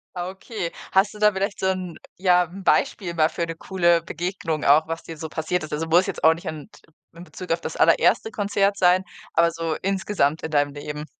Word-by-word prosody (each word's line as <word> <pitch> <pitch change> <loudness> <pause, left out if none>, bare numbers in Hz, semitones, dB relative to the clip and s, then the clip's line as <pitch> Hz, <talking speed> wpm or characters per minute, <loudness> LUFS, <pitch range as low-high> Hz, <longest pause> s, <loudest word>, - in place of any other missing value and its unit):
Ah, 180 0 -3
okay, 190 -2 -6 0.2
hast 195 +2 +3
du 210 - -12
da 210 0 +5
vielleicht 195 0 -3
so 190 - 0
'n 185 -3 -2 0.2
ja, 180 -1 +4
'n 185 +3 -11
Beispiel 180 -1 +1
mal 160 -1 +3
für 170 - -3
'ne 165 0 -6
coole 170 -1 +2
Begegnung 170 -1 -4
auch, 145 +3 +5
was 165 0 -5
dir 165 - -9
so 160 +1 -6
passiert 160 +2 -2
ist? 155 - -8
Also, 150 +2 -2
muss 175 +4 +4
jetzt 195 - -5
auch 160 - +7
nicht 165 - -10
an 155 -2 -6
t - - -18 0.3
in 170 - -10
Bezug 180 0 -8
auf 165 0 0
das - - -5
allererste 445 - +3
Konzert 200 -1 +1
sein, 180 0 +4 0.3
aber 170 0 +3
so 165 -1 -3
insgesamt 190 -6 0
in 160 - -4
deinem 145 -1 +1
Leben? 150 +1 -6
175 Hz, 225 wpm, -23 LUFS, 160-190 Hz, 0.3 s, auch